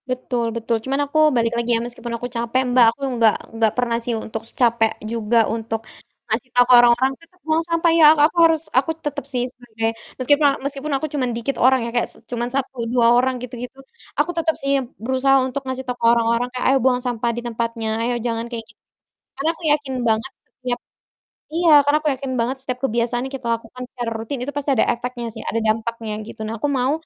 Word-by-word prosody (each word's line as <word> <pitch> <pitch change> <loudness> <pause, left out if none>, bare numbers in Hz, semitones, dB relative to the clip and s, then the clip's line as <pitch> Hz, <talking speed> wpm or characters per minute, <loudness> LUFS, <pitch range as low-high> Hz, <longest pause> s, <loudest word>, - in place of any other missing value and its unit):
Betul 250 -2 -2
betul 230 0 -1
cuman 275 +3 0
aku 285 +2 -4 0.2
balik 230 -1 +1
lagi 235 0 -2
ya, - - -1
meskipun 240 0 -6
aku 245 - -6
capek 235 +1 -1
Mbak, 245 -2 +7
aku - - -23 0.2
nggak 220 -2 +6 0.2
enggak 225 -1 +2
pernah 240 -2 +1
sih 235 +1 -2
untuk 220 0 -5 0.2
capek 235 -2 +4 0.2
juga 230 0 +2
untuk 225 0 -3 0.5
ngasih 235 +3 -2
tau 245 - +7
ke - - +7
orang-orang, 240 +2 +4
"Tetap 355 +2 -22
buang 315 0 +2
sampah 335 0 +2
ya." 315 - +8 0.2
aku 330 - -1
harus 320 -2 +1 0.2
aku 270 +5 +3
tetep 285 -2 -3
sih 245 -1 0
sebagai 225 -3 -3 0.3
meskipun 290 +3 +3
a - - +3
meskipun 280 +1 -4
aku 310 - -3
cuman 260 -4 0
dikit 255 +4 -2
orang 260 +1 +5
ya, - - -3
kayak 240 - +1
s - - -10 0.2
cuman 240 0 -2
1 270 -1 -2 0.2
2 240 -2 +4
orang 260 +1 +2
gitu 250 0 -8
gitu, 250 +2 -8 0.4
aku 350 - +1
tetap 320 -1 +1
sih 275 0 +1 0.3
berusaha 260 +2 +3
untuk 260 +2 -3
ngasih 260 0 -3
tau 250 -1 -4
ke - - +1
orang-orang 235 +1 +2
kayak, 250 - -2
"Ayo - - +4
buang 250 -1 +3
sampah 240 -1 -1
di - - -2
tempatnya 230 -1 -3
ayo 240 +2 0
jangan 230 -1 -1
kayak 235 -2 -5
gitu," 230 - -23 0.6
karena 295 +4 +1
aku 340 - -15
yakin 290 -3 0
banget 225 +4 0 0.2
setiap 250 -1 -4 0.8
iya, 340 0 +3 0.2
karena 290 +1 +4
aku 310 - +1
yakin 270 0 -5
banget 245 +3 -1
setiap 255 -1 -4
kebiasaan 240 0 0
kita 265 -3 -6
lakukan 230 +2 -9
secara 240 -2 -3
rutin 225 +5 -4
itu 285 - -5
pasti 290 0 -1
ada - - +4
efeknya 240 0 -5
sih, 225 - -8
ada 230 - -1
dampaknya 225 0 -1
gitu. 225 - -11
Nah 220 +1 -4
aku 290 - 0
mau 265 -1 +1
245 Hz, 215 wpm, -21 LUFS, 230-270 Hz, 0.8 s, ya